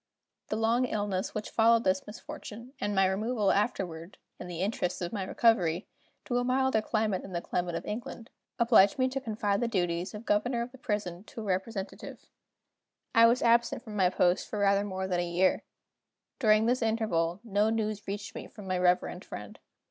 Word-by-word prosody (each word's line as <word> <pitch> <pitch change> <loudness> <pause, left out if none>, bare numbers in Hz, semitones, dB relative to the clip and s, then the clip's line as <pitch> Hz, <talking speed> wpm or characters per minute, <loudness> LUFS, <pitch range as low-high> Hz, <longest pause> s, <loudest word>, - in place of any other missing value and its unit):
The - - -2
long 230 +3 +2
illness 205 -5 -2
which 215 - -4
followed 230 +1 +4
this 190 0 0
misfortune, 235 +1 -9
and 205 0 -1
my 195 0 +4
removal 210 +2 +1
afterward 185 -5 -2 0.2
(in 180 - -7
the 175 -1 -5
interests 190 -3 -1
of 175 +2 -4
my 200 -3 -2
recovery) 185 -4 +2 0.4
to 245 -1 0
a - - 0
milder 255 -2 +2
climate 215 -3 0
than 190 - -10
the 170 - 0
climate 175 -1 -2
of - - -4
England, 230 +1 -6 0.3
obliged 230 -2 +5
me 255 -1 +3
to 270 +1 -3
confide 210 -3 -1
the 240 - +1
duties 175 -2 -1
of 210 +2 -8
governor 235 +4 +1
of 240 - -8
the 265 - -15
prison 205 -7 -3
to 225 - -8
a - - -6
representative. 195 +1 -4 0.9
I 230 0 +7
was 240 +2 +2
absent 235 0 +3
from 215 -2 -8
my 185 -3 +3
post 180 0 +1
for 215 - -4
rather 200 0 +3
more 190 -2 -3
than 180 -2 0
a - - +1
year. 180 +2 +2 0.8
During 215 -3 +4
this 250 +2 +1
interval 215 -7 0
no 210 -1 +1
news 215 -2 -2
reached 205 +1 -5
me - - -7
from 210 -3 -12
my 185 -1 -1
reverend 180 0 +1
friend. - - -9
210 Hz, 190 wpm, -29 LUFS, 185-230 Hz, 0.9 s, I